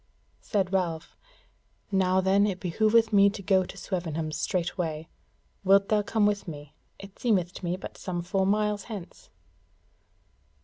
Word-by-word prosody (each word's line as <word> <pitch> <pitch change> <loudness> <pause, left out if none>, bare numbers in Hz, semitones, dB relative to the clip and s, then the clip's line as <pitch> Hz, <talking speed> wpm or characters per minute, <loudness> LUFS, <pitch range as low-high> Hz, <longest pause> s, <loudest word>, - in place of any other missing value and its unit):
Said 195 -2 -1
Ralph: 170 -4 -2 0.8
"Now 190 -1 +3
then 195 +2 +3
it 190 -3 -3
behoveth 220 +5 +2
me 200 0 +6
to 200 0 -8
go 190 0 +3
to 190 - -10
Swevenham 165 -5 -3
straightway: 165 -2 -2 0.5
wilt 195 +1 +4
thou 215 -1 +3
come 210 +1 +1
with 205 -1 0
me? 145 -3 -8 0.2
it 195 0 -13
seemeth 185 -7 +1
to - - -9
be 175 -1 -1
but - - -9
some 175 -2 -4
four 190 +1 0
miles 210 0 0
hence." 205 -7 -9
190 Hz, 145 wpm, -27 LUFS, 175-205 Hz, 0.8 s, me